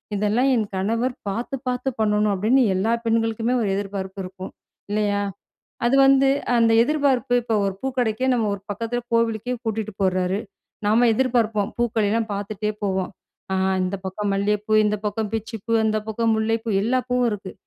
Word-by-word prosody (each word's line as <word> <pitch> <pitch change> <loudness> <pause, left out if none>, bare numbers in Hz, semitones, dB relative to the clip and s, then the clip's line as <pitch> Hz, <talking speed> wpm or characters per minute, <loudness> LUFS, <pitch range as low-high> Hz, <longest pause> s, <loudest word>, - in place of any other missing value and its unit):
இதெல்லாம் 210 +6 +2
என் 220 -3 +1
கணவர் 230 +6 0
பார்த்து 235 +7 -3
பார்த்து 250 +2 -1
பண்ணணும்," 210 -1 +2
அப்படின்னு 230 +8 +3
எல்லா 210 +5 +1
பெண்களுக்குமே 225 +1 +1
ஒரு 210 - 0
எதிர்பார்ப்பு 195 -1 -4
இருக்கும், 185 +1 -8 0.4
இல்லையா? 205 -1 +1 0.7
அது 255 +3 +3
வந்து 270 0 +5 0.3
அந்த 230 -1 +4
எதிர்பார்ப்பு 270 -3 +1
இப்போ 230 -1 -1
ஒரு 195 - -2
பூக்கடைக்கே 250 -2 -1
நம்ம 235 -2 +1
ஒரு 200 - -8
பக்கத்தில 230 +4 -2
கோவிலுக்கே 230 +1 +1
கூட்டிட்டு 220 -1 -2
போறாரு, 185 0 +1 0.5
நாம் 230 +3 +4
எதிர்பார்ப்போம் 225 -4 +1
பூக்களெல்லாம் 225 -1 +1
பார்த்துட்டே 205 +1 -3
போவோம், 190 -2 -1 0.4
அ - - +1 0.3
"இந்த 185 +2 -2
பக்கம் 200 +2 -2
மல்லிய 205 +1 +1
பூ, 215 - -2
இந்த 210 0 +1
பக்கம் 210 0 -2
பிச்சி 225 +1 -3
பூ, 230 - -1
அந்த 215 0 +1
பக்கம் 225 +1 +1
முல்லை 220 +1 +1
பூ, - - -5
எல்லா 245 +5 +2
பூவும் 250 -1 +2
இருக்கு. 195 -2 -6
220 Hz, 160 wpm, -23 LUFS, 205-240 Hz, 0.7 s, வந்து